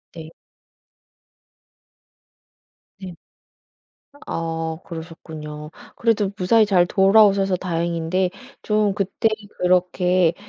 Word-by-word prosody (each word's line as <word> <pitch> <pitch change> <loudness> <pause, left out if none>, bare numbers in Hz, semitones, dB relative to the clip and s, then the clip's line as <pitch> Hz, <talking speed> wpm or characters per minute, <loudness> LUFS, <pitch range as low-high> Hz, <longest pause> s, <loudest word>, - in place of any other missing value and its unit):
네. 160 -1 -9 2.7
네. 185 -2 -8 1.1
아 165 -1 -3
그러셨군요. 160 -3 -9 0.2
그래도 220 -4 +1
무사히 215 +4 +4
잘 185 -4 +3
돌아오셔서 195 0 +4
다행인데 170 +1 -1 0.3
좀 210 -2 +1
그때 200 +2 0 0.3
그렇게 180 -1 +2
180 Hz, 170 characters per minute, -21 LUFS, 165-195 Hz, 2.7 s, 무사히